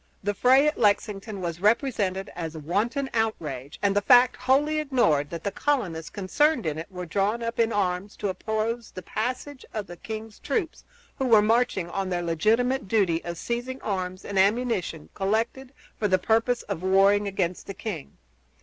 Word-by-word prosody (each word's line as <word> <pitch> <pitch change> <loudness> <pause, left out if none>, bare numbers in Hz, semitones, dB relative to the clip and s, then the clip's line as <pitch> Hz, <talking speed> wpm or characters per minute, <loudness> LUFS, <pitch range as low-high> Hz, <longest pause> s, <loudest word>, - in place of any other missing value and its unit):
The 205 +1 0
fray 260 +7 +5
at 300 - -1
Lexington 205 -1 0
was 170 -1 -3
represented 205 -4 +1
as 165 -2 -5
a - - -5
wanton 215 - -1
outrage, 155 - -2
and 200 -1 +2
the 205 - +3
fact 250 +3 +6
wholly 280 +5 +2
ignored 240 - +2
that 170 -1 -6
the 200 - -1
colonists 190 - -1
concerned 240 - +1
in 155 0 -2
it 165 - -8
were 180 -1 -6
drawn 200 +7 0
up 230 0 -4
in 230 0 +3
arms 195 0 -1
to 205 - -3
oppose 220 +4 -2
the 185 - -9
passage 255 - -4
of 215 -2 -2
the 175 -2 -10
king's 220 +1 -7
troops, 365 -9 -3 0.3
who 265 - +1
were 220 -3 +6
marching 225 -5 +2
on 190 +2 -3
their 175 -1 -1
legitimate 225 - +1
duty 185 -6 +2
of 170 -1 -5
seizing 245 +6 -3
arms 185 -2 -3
and 200 -1 -1
ammunition 200 -6 +1
collected 225 +6 -1 0.3
for 210 - +2
the 185 -1 +3
purpose 225 +5 +1
of 160 - -4
warring 195 +2 +4
against 185 -3 -2
the 195 - -6
king. 190 -8 -6
205 Hz, 175 wpm, -26 LUFS, 185-240 Hz, 0.3 s, fact